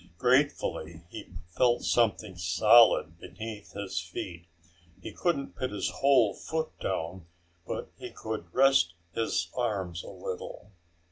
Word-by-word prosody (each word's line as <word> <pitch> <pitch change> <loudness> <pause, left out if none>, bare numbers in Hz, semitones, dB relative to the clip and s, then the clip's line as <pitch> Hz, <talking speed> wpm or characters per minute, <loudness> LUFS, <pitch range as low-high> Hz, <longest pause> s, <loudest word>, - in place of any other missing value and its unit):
Gratefully 120 - +1
he - - -8 0.2
felt 120 +6 +2
something 110 -4 +1
solid 85 0 +5
beneath 105 +4 -8
his 100 -3 -3
feet. 85 0 -7 0.5
He - - -7
couldn't 165 -6 -1
put 130 - -2
his 105 - -2
whole 130 -7 +4
foot 160 +7 -3
down, 90 -1 -3 0.4
but - - -4
he - - -6
could 110 -6 -6
rest 130 -11 +4 0.2
his 115 - -1
arms 95 -8 -2
a - - -9
little. 95 +2 -7
105 Hz, 125 wpm, -29 LUFS, 85-120 Hz, 0.5 s, solid